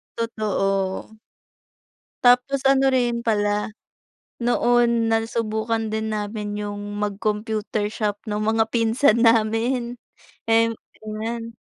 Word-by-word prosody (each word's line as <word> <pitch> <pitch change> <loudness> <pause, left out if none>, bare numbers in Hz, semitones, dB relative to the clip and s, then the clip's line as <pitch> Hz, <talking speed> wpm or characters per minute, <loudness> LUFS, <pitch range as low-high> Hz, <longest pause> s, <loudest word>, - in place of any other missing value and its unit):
Totoo. 205 -2 -2 1.0
Tapos 250 +3 +4
ano 270 0 +4
rin 240 -2 +1
pala, 210 -1 0 0.7
noon 240 -1 +2
nasubukan 225 -1 -1
din 220 0 -2
namin 210 0 -4
yung 205 0 -5
mag-computer 210 +1 -2
shop 210 -2 -1
nung 210 0 -2
mga 225 0 +2
pinsan 230 +1 +3
namin 235 +2 +2 0.5
eh 230 0 +5 0.3
ayan. 225 +2 -5
220 Hz, 90 wpm, -23 LUFS, 210-235 Hz, 1.0 s, eh